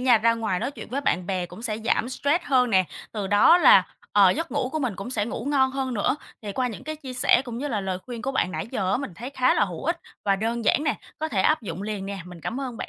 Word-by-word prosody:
nha, 250 -3 +5
ra 230 +1 +3
ngoài 215 -5 -1
nói - - -1
chuyện - - -10
với 270 +3 -1
bạn 180 -10 0
bè 185 -2 -1
cũng 220 - -11
sẽ 215 -3 -2
giảm 230 +2 0
stress 285 +6 0
hơn 250 -3 +3
nè, 190 -2 +4 0.3
từ 210 -3 -3
đó 210 - +6
là, 485 +7 +7 0.3
ờ, 200 -3 +6
giấc 330 - -2
ngủ 250 - 0
của 315 - -1
mình 245 -10 -2
cũng 200 +6 -6
sẽ 210 -4 0
ngủ 235 - -5
ngon 270 -2 +2
hơn 265 -2 -2
nữa. 220 +7 +1 0.3
Thì 205 - -5
qua 250 +4 0
những 235 +4 -8
cái 310 0 -4
chia 265 -4 -8
sẻ 250 0 +3
cũng 240 -1 -6
như 290 +2 -3
là 210 -6 -1
lời 190 -1 -3
khuyên 240 -2 -6
của 270 +1 -2
bạn 185 - 0
nãy - - -4
giờ 195 -7 -1
á, - - +3
mình 250 -9 -6
thấy 240 +9 -7
khá 255 -2 +2
là - - +3
hữu 175 0 -7
ích 335 +2 -1 0.2
và 195 -1 +3
đơn 230 +3 -2
giản 290 +8 +3
nè, 290 - 0 0.2
có 315 - -2
thể 205 -10 0
áp 310 +6 +3
dụng 185 -1 -5
liền 205 -2 -4
nè. 200 -1 -5
Mình 180 -2 -11
cảm 245 - -4
ơn 255 -3 -5
bạn - - -5
235 Hz, 300 wpm, -25 LUFS, 200-270 Hz, 0.3 s, là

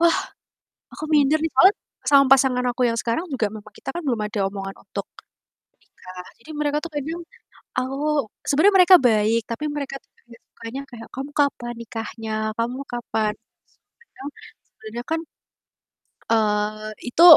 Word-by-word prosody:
Wah, 340 0 +5 0.8
aku - - -5
minder 295 +1 +5
nih, 325 - 0
soalnya 375 +10 +7 0.4
sama 280 -1 +7
pasangan 255 -2 +3
aku 245 - -5
yang 230 - -1
sekarang 235 +9 -1
juga 230 -5 +1
memang 215 -1 -11
kita - - -7
kan 345 - -3
belum 235 -5 +1
ada 210 0 -4
omongan 195 -1 -6
untuk - - -5 0.7
menikah, 185 0 -12 0.2
jadi 310 - -11
mereka 295 0 +1
tuh 335 - -5
kadang 320 +4 -3 0.6
aku 260 +1 -1 0.5
sebenernya 345 +8 +5
mereka 365 0 +9
baik 220 +1 +3
tapi 295 +6 -3
mereka 280 -2 -4
tuh - - -38
paling - - -33
nggak 235 - -15
sukanya 235 +4 -7
kayak, 230 -2 -10
"Kamu 275 +3 -5
kapan 245 -4 +1
nikahnya? 225 -1 -5 0.2
Kamu 240 +3 -1
kapan?" 220 -3 -1 0.7
Kadang 285 - -9 0.4
sebenernya 225 +2 -8
kan, 325 - +2 1.1
eee, 215 0 +1 0.2
itu 330 +7 +4
245 Hz, 150 wpm, -23 LUFS, 220-290 Hz, 1.1 s, mereka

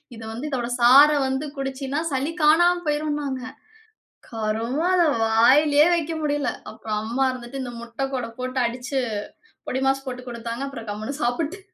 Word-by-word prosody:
"இது 225 - -10
வந்து 245 +7 -5
இதோட 245 -3 -2
சார 265 +5 +8 0.2
வந்து 265 +3 -2
குடிச்சின்னா, 270 +1 -3
சளி 275 +4 -1
காணாம 345 +3 +5
போயிரும்னாங்க." 295 -3 -1 0.9
கருமோ! 225 +6 -2
அத 355 - +4 0.2
வாய்லயே 285 +7 +5
வைக்க 330 -1 -2
முடியல, 290 -1 0 0.2
அப்பறம் 215 -1 -4
அம்மா 255 +4 0
இருந்துட்டு 255 +1 -7
இந்த 245 -1 -6
முட்டை 235 +3 -4
கூட 250 -2 -2
போட்டு 255 +1 -2
அடிச்சு, 245 +3 -2 0.7
பொடிமாஸ் 270 +1 0
போட்டு 250 0 -5
குடுத்தாங்க, 235 +2 -5
அப்பறம் 230 -6 -8
கம்முனு 215 +7 -5
சாப்புட்டு 300 +10 -1
265 Hz, 145 wpm, -23 LUFS, 235-290 Hz, 0.9 s, சார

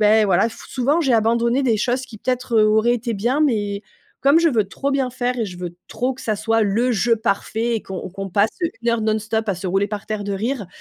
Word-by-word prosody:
bah 215 +1 +5
voilà, 195 +4 +3
f - - -12
souvent 275 +6 +1
j'ai 270 -6 +2
abandonné 235 +4 +2
des 235 -4 +2
choses 245 +4 0
qui 220 -4 -12
peut-être, 250 0 -2
heu, 215 - +6
auraient 220 +3 +3
été 235 0 -3
bien 235 +6 0
mais 205 -7 0 0.4
comme 280 +4 +5
je 335 - +4
veux 225 -7 +2
trop 275 +8 -3
bien 265 -2 0
faire 250 0 -2
et - - +1
je 180 -4 -8
veux 175 -1 -6
trop 250 +4 -2
que 265 - -13
ça 215 - 0
soit 225 +1 +1
le 225 +5 +1
jeu 230 +2 +2
parfait 225 +2 -1
et - - -5
qu'on 190 -1 -6
qu'on 195 +1 -6
passe 205 +4 +3 0.3
une 235 - -1
heure 235 -1 +2
non-stop 220 +1 -1
à 195 - +1
se 185 - -5
rouler 195 +2 +1
par 205 -1 -5
terre 215 -1 -3
de 200 - -3
rire, 220 +2 -2
225 Hz, 250 wpm, -21 LUFS, 205-245 Hz, 0.4 s, heu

